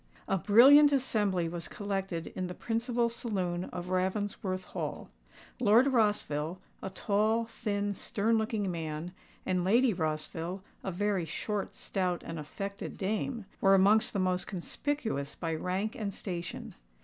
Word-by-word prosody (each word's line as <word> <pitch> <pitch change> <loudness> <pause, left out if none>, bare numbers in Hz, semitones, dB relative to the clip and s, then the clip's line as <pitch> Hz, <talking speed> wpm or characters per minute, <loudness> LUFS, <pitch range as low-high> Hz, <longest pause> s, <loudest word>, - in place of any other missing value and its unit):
A - - +2
brilliant 270 - +8
assembly 210 -10 +1
was 170 0 -5
collected 195 -4 -3
in 185 - -2
the 180 - -6
principal 235 +1 0
saloon 185 -7 -2
of 180 0 -6
Ravensworth 185 0 -1
Hall. - - -5 0.5
Lord 230 +2 +6
Rossville,—a 185 - -1
tall, 215 +4 +1
thin, 205 -2 -2
stern 215 +3 0
looking 220 -3 0
man,—and 170 +3 -4
Lady 230 +5 +4
Rossville,—a 165 +4 -4
very 195 -1 0
short, 200 +6 -3
stout, 180 -2 -2
and 165 -1 -5
affected 200 +7 -6
dame,—were 200 -1 +1
amongst 205 +3 +4
the - - -1
most 185 -1 0
conspicuous 210 - -3
by 165 -2 -3
rank 185 +6 -2
and 210 -3 -3
station. 175 -3 -5
195 Hz, 125 wpm, -31 LUFS, 180-220 Hz, 0.5 s, brilliant